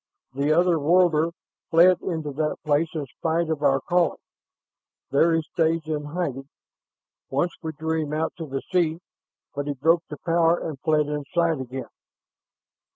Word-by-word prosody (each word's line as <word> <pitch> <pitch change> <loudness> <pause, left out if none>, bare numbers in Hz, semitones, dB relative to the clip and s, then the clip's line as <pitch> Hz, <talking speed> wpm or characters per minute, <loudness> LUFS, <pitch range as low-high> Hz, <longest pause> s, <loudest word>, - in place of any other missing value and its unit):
"The 140 +3 0
other 175 0 +3
worlder 165 0 +3 0.4
fled 175 +2 +5
into 160 -4 -3
that 150 +2 -1
place 150 +2 +2
in 150 -3 -2
spite 160 +5 -1
of 155 -2 -2
our 135 -2 +3
calling. 175 +3 +1 0.9
There 165 +4 +4
he 165 - 0
stays 165 0 +2
in 150 -2 -3
hiding. 145 -4 -4 0.8
Once 155 +6 0
we 160 -1 -4
drew 160 +1 -1
him 145 - -7
out 160 +1 -1
to 165 -2 -6
the 135 -1 -4
sea, 170 -3 +2 0.6
but 145 0 -4
he 145 - -2
broke 165 +5 +3
the 150 - -7
power 170 0 +3
and 155 -6 -5
fled 155 -2 +2
inside 150 +2 0
again." 130 +1 -6
160 Hz, 155 wpm, -24 LUFS, 145-165 Hz, 0.9 s, fled